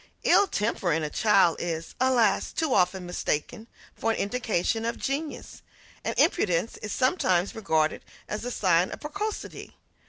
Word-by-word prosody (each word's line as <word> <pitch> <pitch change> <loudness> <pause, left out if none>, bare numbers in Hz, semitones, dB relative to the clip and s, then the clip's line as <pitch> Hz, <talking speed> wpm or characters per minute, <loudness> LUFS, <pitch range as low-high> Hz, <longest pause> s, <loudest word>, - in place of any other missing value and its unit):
Ill 405 - +5
temper 210 - -1
in 160 0 +1
a 150 - -3
child 195 -6 +4
is, 165 -1 -4
alas! 240 -6 +2
too 315 -5 0
often 180 0 +2
mistaken 175 +6 -3 0.3
for 225 - -1
an 225 - +1
indication 225 -1 -1
of 230 +1 -2
genius; 290 +3 -4 0.4
and - - -3
impudence 180 - +2
is 210 - -6
sometimes 200 - +1
regarded 160 -8 0 0.2
as 210 - -4
a 245 - -3
sign 180 -6 +2
of - - -7
precocity. 405 +8 -5
210 Hz, 150 wpm, -27 LUFS, 175-250 Hz, 0.4 s, Ill